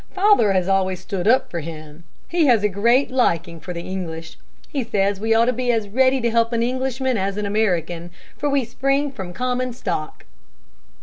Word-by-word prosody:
Father 390 - +4
has 185 -1 +1
always 190 -1 +1
stood 185 0 -4
up 255 +4 +3
for 170 - -3
him. 155 0 -9 0.2
He 335 -3 +2
has 230 -5 +4
a - - +4
great 235 +8 +2
liking 170 -9 0
for 180 - -8
the 170 -1 -5
English. 165 -4 -6 0.3
He 275 -3 -2
says 200 -3 0
we 225 +2 +1
ought 230 +1 +5
to 250 - +1
be 250 0 0
as 220 -3 -1
ready 260 +4 +3
to 235 0 +1
help 230 +1 +2
an 230 0 +1
Englishman 260 -1 -1
as 195 +1 -2
an 210 - -2
American, 175 -5 -1 0.3
for 290 - -1
we 280 -3 +1
spring 275 +4 0
from 190 -9 -7
common 250 +4 -2
stock." 175 -10 -4
220 Hz, 195 wpm, -21 LUFS, 185-255 Hz, 0.3 s, ought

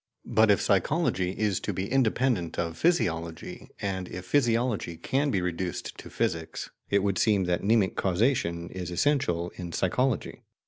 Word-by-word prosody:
But 110 0 +3
if 100 - +5
psychology 100 - +1
is 105 -4 +1
to - - -3
be 95 +1 -3
independent 125 -7 +1
of 85 -1 -2
physiology, 85 - -1
and 95 -2 -3
if 90 0 -7
physiology 115 - +1
can 140 - 0
be 95 -7 +1
reduced 90 0 -3
to - - -9
physics, 80 -1 -3 0.2
it 100 -1 +2
would 100 -2 0
seem 105 -4 +3
that 90 -1 0
mnemic 105 -2 +2
causation 90 -4 0
is 90 -2 -5
essential 90 - +1
in 85 -2 -6
psychology. 125 +6 0
95 Hz, 150 wpm, -27 LUFS, 90-115 Hz, 0.2 s, if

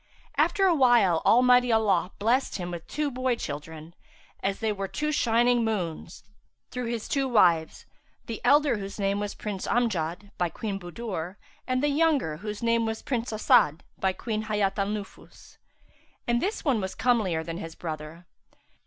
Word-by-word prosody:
After 390 - +3
a 365 - +5
while 240 - +4
Almighty 250 +1 +5
Allah 210 -6 +2
blessed 240 +6 +1
him 175 -2 -4
with 170 -1 -7
two 300 -1 -2
boy 255 -1 0
children, 160 -2 -7 0.5
as 195 0 -1
they 220 -1 0
were 195 -1 -3
two 300 +9 -2
shining 240 -2 +3
moons, 180 -6 -3 0.5
through 250 -1 -4
his 230 -2 -3
two 275 -1 0
wives; 175 -8 +3 0.4
the 225 - -6
elder 290 -4 +4
whose 195 0 -7
name 200 0 0
was 205 0 -4
Prince 205 -3 -5
Amjad,[FN#356] 200 -5 -1
by 175 -1 +1
Queen 200 +2 -4
Budur, 180 -1 -5 0.3
and 255 +1 0
the 295 - +3
younger 285 - +1
whose 210 +5 -6
name 230 0 +2
was 220 0 -4
Prince 240 -3 -2
As'ad 165 -7 +3 0.2
by 190 - +2
Queen 215 +2 -4
Hayat 210 -2 0
al 195 - +1
Nufus; 205 -1 -8 0.7
and 240 0 +2
this 410 0 -2
one 255 -7 +2
was 190 0 -4
comelier 215 -9 +1
than 165 0 -5
his 165 -3 -7
brother. 160 +1 -7
215 Hz, 165 wpm, -27 LUFS, 180-245 Hz, 0.7 s, a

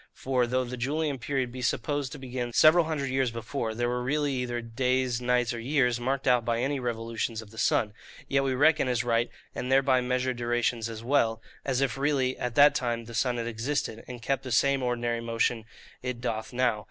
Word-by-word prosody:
For, 130 -2 0
though 130 +1 +1
the 125 0 -6
Julian 145 +2 -1
period 130 -1 -2
be 130 +1 -7
supposed 135 +3 -1
to - - -7
begin 125 -2 -5
several 160 +5 +6
hundred 145 -4 -2
years 130 -1 +1
before 115 0 -4
there 120 +1 0
were 125 0 -1
really 145 +2 0
either 125 -2 -2
days, 125 +1 0
nights, 125 -1 +1
or 120 - -5
years, 125 -1 +1
marked 135 +3 -1
out 125 -2 +4
by 115 0 0
any 135 +3 0
revolutions 115 -2 -3
of 110 -2 -10
the 110 - -9
sun,—yet 115 +5 -1
we 135 -1 0
reckon 150 +1 +4
as 125 -1 +1
right, 120 0 +1 0.2
and 125 - -4
thereby 135 -1 +4
measure 125 +1 0
durations 120 -1 -1
as 110 0 -7
well, 115 -4 +2 0.2
as 135 -1 0
if 135 -1 0
really 135 -3 +1
at 125 -1 -3
that 145 0 +7
time 120 -2 -2
the 115 - -10
sun 120 +1 0
had 115 - -2
existed, 115 0 -2
and 120 -2 -8
kept 135 +1 0
the 130 -2 -7
same 135 +3 +3
ordinary 120 -1 -1
motion 115 -1 0 0.4
it 125 -1 -4
doth 110 -2 -3
now. 125 -3 +1
125 Hz, 205 wpm, -28 LUFS, 120-135 Hz, 0.4 s, that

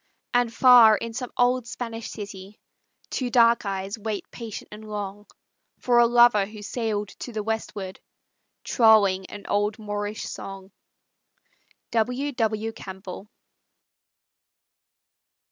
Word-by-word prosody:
And 245 -1 +2
far 230 -3 +7
in 230 +2 -6
some 250 +1 -5
old 245 -1 +2
Spanish 230 -1 -6
city, 200 -1 -9 0.5
Two 255 -2 -2
dark 235 -2 +4
eyes 195 +2 -4
wait 215 -1 -4
patient 230 -3 -8
and 215 +1 -10
long 205 0 -6 0.5
For 240 -1 +3
a 235 - +6
lover 240 -4 +5
who 215 0 -10
sailed 210 -2 -2
to 245 - -6
the 215 -2 -3
westward, 210 -3 -4 0.6
Trolling 205 -5 +4
an 205 - -10
old 205 +2 0
Moorish 205 0 -4
song. 195 0 -8 1.2
W. 250 +5 0
W. 225 -3 -1
CAMPBELL. 190 0 -9
220 Hz, 115 wpm, -25 LUFS, 205-235 Hz, 1.2 s, far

